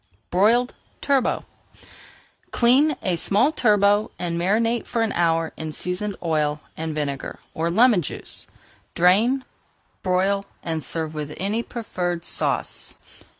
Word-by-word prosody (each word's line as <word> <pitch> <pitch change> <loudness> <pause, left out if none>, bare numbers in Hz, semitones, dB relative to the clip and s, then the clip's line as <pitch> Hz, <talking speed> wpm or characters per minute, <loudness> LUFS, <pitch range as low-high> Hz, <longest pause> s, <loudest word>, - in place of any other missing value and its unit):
BROILED 230 +7 +3 0.3
TURBOT 275 -3 +1 1.0
Clean 270 +5 +4
a 185 -4 +1
small 205 - +2
turbot 210 -6 +3
and 170 -1 -2
marinate 225 +7 +1
for 230 -2 0
an 220 - -1
hour 165 -1 +1
in 160 -1 -5
seasoned 185 +5 -2
oil 150 -2 0 0.2
and 160 -1 -4
vinegar 140 -2 -3 0.2
or 165 +1 -1
lemon 220 +1 +4
juice. 145 - -1 0.5
Drain, 220 +10 +3 0.6
broil, 195 +2 +1 0.2
and 160 -2 -3
serve 160 +3 -2
with 150 -1 -5
any 205 +4 0
preferred 180 -8 -4
sauce. - - 0
185 Hz, 120 wpm, -23 LUFS, 165-230 Hz, 1.0 s, Clean